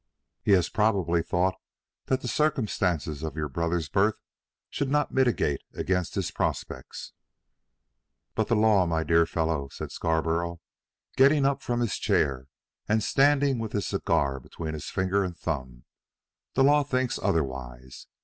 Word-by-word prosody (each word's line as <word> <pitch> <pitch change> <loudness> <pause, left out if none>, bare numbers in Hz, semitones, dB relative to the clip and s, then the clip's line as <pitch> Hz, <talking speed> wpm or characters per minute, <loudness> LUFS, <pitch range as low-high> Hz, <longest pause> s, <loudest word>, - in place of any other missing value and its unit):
"He 100 - +3
has 90 -3 +4
probably 95 -6 +1
thought 90 +3 +1 0.5
that 130 0 0
the - - -5
circumstances 95 - 0
of 80 -2 -4
your 75 -1 -2
brother's 85 +2 -1
birth 100 +8 +1 0.5
should 140 - -2
not 150 +1 +1
militate 120 - +1
against 90 -2 -1
his - - -1
prospects." - - -4 1.2
"But 110 - 0
the 115 - +2
law, 105 -4 +4
my 80 -1 0
dear 85 0 +3
fellow," 80 -4 -1
said - - -7
Scarborough, 85 +1 -1 0.6
getting 140 +1 +5
up 140 0 +1
from 120 0 -1
his 120 - 0
chair 65 -1 +1 0.4
and 110 0 +2
standing 140 -2 +3
with 110 -2 -4
his 100 -3 -1
cigar 70 -1 0
between 80 +4 -6
his 75 - -6
finger 95 +1 +1
and 90 -2 -5
thumb, 65 -6 -4 0.7
"the 135 - +4
law 145 +2 +5
thinks 130 -3 -1
otherwise. 65 -4 -3
90 Hz, 145 wpm, -27 LUFS, 80-120 Hz, 1.2 s, getting